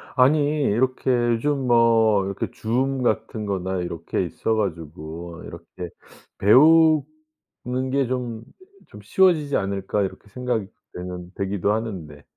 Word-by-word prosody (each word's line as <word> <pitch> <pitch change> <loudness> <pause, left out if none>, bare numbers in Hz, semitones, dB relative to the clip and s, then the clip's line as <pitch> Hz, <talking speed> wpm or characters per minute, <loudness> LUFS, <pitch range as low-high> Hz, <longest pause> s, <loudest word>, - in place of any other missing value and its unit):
아니 135 +4 +5 0.2
이렇게 130 +4 0 0.2
요즘 135 +3 -1
뭐 115 -4 +4
이렇게 100 0 -3
줌 130 +4 -1
같은 110 -1 -1
거나 95 -2 -2
이렇게 85 +1 -3
있어 110 +6 -2
가지고 85 -3 -5
이렇게 85 +1 -9 0.5
'배우는 155 0 +3
게 135 -2 +1
좀, 120 -3 -4 0.4
좀 105 - -13
쉬워지지 150 - +3
않을까?' 100 +1 -2
이렇게 100 +2 -6
생각이 120 -2 -2 0.3
되는 90 0 -7
되기도 100 +1 0
하는데. 90 -10 -5
110 Hz, 260 characters per minute, -23 LUFS, 95-130 Hz, 0.5 s, 아니